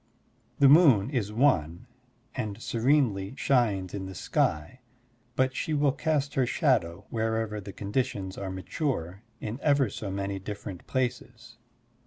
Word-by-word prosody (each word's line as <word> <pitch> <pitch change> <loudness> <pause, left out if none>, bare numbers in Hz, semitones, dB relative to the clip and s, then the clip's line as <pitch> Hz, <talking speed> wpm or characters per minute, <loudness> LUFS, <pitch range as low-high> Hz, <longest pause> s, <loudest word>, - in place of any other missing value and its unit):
The 140 - +6
moon 135 - +6
is 110 -7 -1
one 90 - +1 0.5
and 105 -1 -4
serenely 120 -4 +1
shines 105 -10 +1
in 95 -2 -4
the 95 - -8
sky, 75 +7 -1 0.6
but 130 0 +1
she 155 - -1
will 145 -1 +3
cast 145 -1 -1
her 130 -2 +1
shadow, 105 - +1
wherever 110 -2 -1
the 100 0 -8
conditions 100 -2 -3
are 95 - -5
mature, 95 - -3 0.2
in 110 +4 -5
ever 140 -7 +3
so 105 - -5
many 100 0 -3
different 100 -1 -7
places. 120 -2 -3
110 Hz, 135 wpm, -28 LUFS, 95-130 Hz, 0.6 s, The